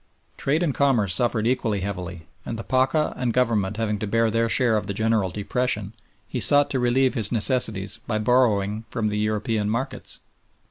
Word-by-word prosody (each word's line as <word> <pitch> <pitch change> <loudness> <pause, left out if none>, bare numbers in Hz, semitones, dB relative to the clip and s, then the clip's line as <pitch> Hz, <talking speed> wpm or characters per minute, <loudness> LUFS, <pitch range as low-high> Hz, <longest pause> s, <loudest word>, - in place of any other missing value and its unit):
Trade 155 +5 0
and 150 -5 0
commerce 120 -11 +2
suffered 115 +1 0
equally 115 -5 0
heavily, 90 -3 -5 0.2
and 115 - -5
the 115 - -5
Pacha 130 +4 +1
and 125 -2 -1
Government 110 -5 0
having 105 -2 -1
to 110 - -3
bear 115 +1 +1
their 115 +1 +1
share 120 -1 +3
of 105 -2 -2
the 100 - -4
general 110 -3 +1
depression, 105 +1 -2 0.3
he - - -4
sought 145 0 +4
to 130 - 0
relieve 125 +2 +2
his 110 -5 0
necessities 110 -4 0
by 110 - 0
borrowing 110 -3 +1
from 110 -2 -1
the 105 0 -2
European 105 0 -1
markets. 115 +5 -4
110 Hz, 180 wpm, -24 LUFS, 105-125 Hz, 0.3 s, sought